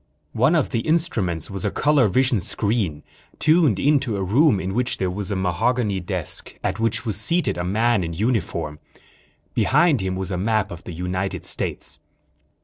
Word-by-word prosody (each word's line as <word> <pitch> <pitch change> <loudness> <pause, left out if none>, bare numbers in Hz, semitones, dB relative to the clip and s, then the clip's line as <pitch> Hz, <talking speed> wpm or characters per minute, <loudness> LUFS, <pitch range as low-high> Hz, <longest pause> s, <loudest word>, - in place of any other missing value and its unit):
One - - +3
of - - +1
the - - 0
instruments 115 - 0
was 95 -2 -4
a - - +1
color 145 -5 +3
vision 125 +3 +2
screen, 95 -5 -1 0.3
tuned 155 - +3
in 145 +6 +3
to 120 -7 -3
a 95 - -2
room 120 - +3
in 95 +1 -3
which 125 +3 0
there 95 -1 -1
was 100 +1 -4
a 100 - -1
mahogany 95 +4 0
desk, 90 -3 -3
at - - -2
which 115 +1 0
was 105 -3 -1
seated 170 +10 +1
a 85 - -3
man 110 +3 +1
in 85 0 -4
uniform. 85 -7 -2 0.7
Behind 160 - +3
him 95 0 -2
was 95 +1 -4
a 90 - -2
map 110 +1 0
of 85 - -9
the 90 - -7
United 90 +3 -3
States. - - -1
100 Hz, 180 wpm, -22 LUFS, 90-125 Hz, 0.7 s, One